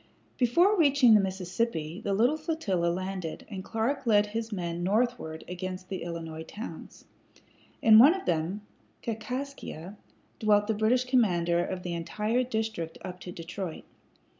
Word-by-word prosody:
Before 340 - +4
reaching 280 -6 +6
the 215 - +7
Mississippi 190 -2 -2
the 200 - 0
little 240 +8 +3
flotilla 305 - -1
landed, 185 -1 -3
and 190 -2 -5
Clark 235 +6 -2
led 210 -2 +5
his 225 +2 -4
men 175 -3 -3
northward 200 -5 0
against 185 +1 -6
the 190 - -4
Illinois 165 -2 -5
towns. 210 +8 -9 0.8
In 220 -1 +9
one 290 +9 +8
of 380 - -6
them, 170 +5 -1 0.4
Kaskaskia, 230 - -5 0.4
dwelt 210 -1 +4
the 220 - 0
British 220 +4 +2
commander 175 -9 +2
of 180 0 -4
the 175 - -3
entire 210 +8 -1
district 220 -9 -3
up 180 -1 -7
to 180 - -8
Detroit. 170 0 -6
205 Hz, 140 wpm, -28 LUFS, 175-235 Hz, 0.8 s, In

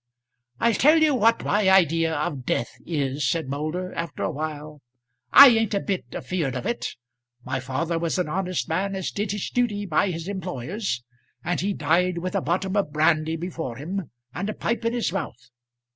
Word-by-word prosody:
"I'll 235 - +3
tell 300 +9 +5
you 310 -2 +4
what 230 -2 +3
my 205 -2 +3
idea 165 -3 +4
of 145 -3 -2
death 120 - -1
is," 140 -4 -1
said 160 -1 -1
Moulder, 155 +7 -3
after 170 - -4
a - - 0
while. 150 -1 -6 0.5
"I 280 -1 +11
ain't 225 -3 +2
a - - +2
bit 190 -8 -2
afeard 140 -2 -3
of 125 - -4
it. 235 - -3 0.5
My 130 - -2
father 160 +6 -2
was 165 +1 -1
an 180 - 0
honest 185 +2 -2
man 195 +4 -1
as 190 -2 -3
did 205 -1 -2
his 205 -2 -3
duty 215 -5 0
by 185 +2 +2
his 165 -1 -5
employers, 180 - -3 0.4
and 175 +1 -1
he 200 +2 0
died 170 +4 +1
with 185 +1 -3
a - - +1
bottom 190 +4 -1
of 195 -7 0
brandy 155 +1 +2
before 165 -7 -5
him 175 +3 -4 0.2
and 200 +3 -3
a 215 - -4
pipe 235 0 -2
in 230 - +1
his 235 -7 -1
mouth. 125 - -5
175 Hz, 190 wpm, -24 LUFS, 155-200 Hz, 0.5 s, I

